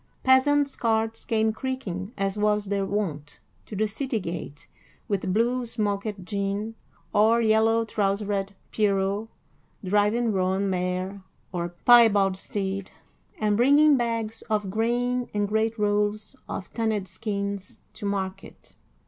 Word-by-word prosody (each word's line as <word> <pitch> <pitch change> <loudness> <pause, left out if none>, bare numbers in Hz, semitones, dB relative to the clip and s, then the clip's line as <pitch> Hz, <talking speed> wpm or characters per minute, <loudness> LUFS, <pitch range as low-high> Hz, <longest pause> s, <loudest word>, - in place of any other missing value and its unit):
Peasants' 275 +2 +4
carts 225 -1 0
came 220 -1 +1
creaking, 220 -7 -4
as 195 0 0
was 210 0 +1
their 200 -1 -1
wont, 160 -8 -3 0.3
to 215 - -7
the 215 +2 +1
city 235 +2 -2
gate, 170 -5 -6 0.4
with 195 -2 -1
blue 240 +5 +1
smocked 205 -4 -2
Jean 200 +2 -2 0.4
or 220 +3 +4
yellow 225 0 +3
trousered 200 -1 -1 0.2
Pierrot 200 0 +1 0.6
driving 210 +4 +2
roan 190 +1 +1
mare 185 +2 -2 0.3
or 175 -2 -2 0.2
piebald 210 -6 +6
steed, 195 0 -3 0.5
and 210 -1 +2
bringing 285 +6 +6
bags 230 -3 -2
of 210 -3 0
grain 245 +3 0
and 205 0 +1
great 220 +2 0
rolls 210 +2 0
of 185 - -6
tanned 220 -4 -1
skins 200 0 -4
to 205 - -5
market. 190 -1 -5
210 Hz, 125 wpm, -26 LUFS, 195-225 Hz, 0.6 s, piebald